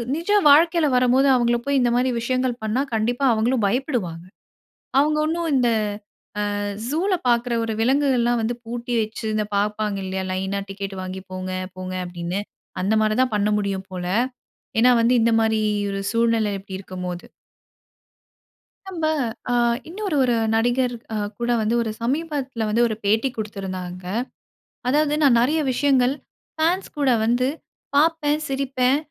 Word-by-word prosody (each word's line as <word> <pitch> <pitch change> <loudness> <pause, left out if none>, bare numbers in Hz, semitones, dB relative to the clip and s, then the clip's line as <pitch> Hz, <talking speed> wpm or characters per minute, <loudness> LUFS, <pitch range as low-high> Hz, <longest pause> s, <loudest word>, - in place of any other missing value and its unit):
நிஜ 335 +5 -5 0.2
வாழ்க்கையில 325 +1 +5
வரம்போது, 255 +2 +4
அவங்கள 240 -1 +2
போய் 280 -1 +2
இந்த 245 -1 +3
மாரி 255 +1 +2
விஷயங்கள் 255 +1 0
பண்ணா, 220 +5 0
கண்டிப்பா 240 +5 0
அவங்களும் 225 +1 +1
பயப்படுவாங்க. 215 - -2 0.8
அவங்க 300 +2 +3
ஒண்ணும் 335 +1 -1
இந்த 245 -2 +3 0.9
அ - - -2 0.3
ஜூல 350 +7 0 0.2
பார்க்குற 240 0 +2
ஒரு 225 - -2
விலங்குகள்லாம் 245 -2 +2
வந்து 235 +2 -1
பூட்டி 240 +1 -4
வச்சு, 220 +1 -6
இந்த 215 -1 0
பார்ப்பாங்க 210 0 -1
இல்லையா? 190 0 -3
லைனா 190 +1 -2
டிக்கெட் 195 0 -5
வாங்கி 185 0 -6
போங்க, 185 0 -5 0.3
போங்க 185 0 -5
அப்படீன்னு? 175 +2 -4 0.4
அந்த 205 +3 +1
மாரிதான் 215 +2 +1
பண்ண 205 +1 +1
முடியும் 195 -2 -3
போல. 180 -1 -4 0.7
ஏன்னா 250 +2 +6
வந்து 245 +2 +3
இந்த 230 - +3
மாரி 220 -1 +2 0.3
ஒரு 195 0 -3
சூழ்நிலை 230 -2 +2
இப்படி 190 -1 -8
இருக்கும்போது. 180 -2 -6 1.6
நம்ப 335 -4 -3 0.5
அ - - +2 0.4
இன்னொரு 390 -3 -3
ஒரு 245 -2 +2 0.2
நடிகர் 245 +2 +1 0.2
அ - - -1 0.2
கூட 240 0 -2
வந்து 220 +2 +1
ஒரு 220 -2 -2
சமீபத்தில 270 -3 -2
வந்து 230 +3 +2
ஒரு 220 - -3
பேட்டி 220 +6 +2
குடுத்துருந்தாங்க. 185 -4 -5 0.8
அதாவது 300 +2 +2
"நான் 250 -4 +5
நெறைய 305 +6 +2
விஷயங்கள் 265 -1 +2 0.4
ஃபேன்ஸ் 345 +5 +1
கூட 280 -2 +2 0.2
வந்து 245 +2 +2 0.5
பார்ப்பேன், 305 -1 +2
சிரிப்பேன், 270 -1 +1
240 Hz, 140 wpm, -22 LUFS, 210-270 Hz, 1.6 s, ஏன்னா